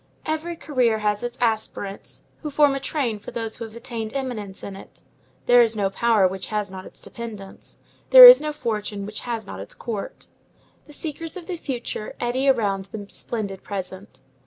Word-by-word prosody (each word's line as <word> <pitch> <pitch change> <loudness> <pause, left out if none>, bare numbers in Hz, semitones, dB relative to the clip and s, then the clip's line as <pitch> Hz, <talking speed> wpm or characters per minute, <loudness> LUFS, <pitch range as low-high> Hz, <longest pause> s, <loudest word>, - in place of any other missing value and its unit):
Every 315 +2 -2
career 250 -8 +1
has 210 -1 0
its 240 +1 -5
aspirants, 215 -4 -2 0.2
who 300 - -4
form 290 -1 +4
a 275 - -2
train 255 -7 -2
for 205 - -9
those 225 -2 -5
who 230 - -5
have 220 0 -12
attained 230 -1 -6
eminence 225 -8 -5
in 195 - -6
it. 195 - -13 0.4
There 245 0 +7
is 230 -1 +2
no 200 -2 0
power 220 -3 +3
which 190 +1 -5
has 210 -2 -2
not 190 0 -8
its - - -12
dependents. 215 -5 -10 0.3
There - - +12
is - - +11
no 305 0 -2
fortune 210 -7 -3
which 210 0 -6
has 230 -3 -4
not 95 - -8
its 100 - -9
court. 215 -4 -6 0.6
The 295 - -13
seekers 320 +3 -6
of 355 - -8
the 360 - -4
future 250 -8 -5
eddy 255 +3 +1
around 200 -7 +1
the 205 +1 -8
splendid 200 -5 -5
present. 190 -4 -7
225 Hz, 185 wpm, -23 LUFS, 205-265 Hz, 0.6 s, There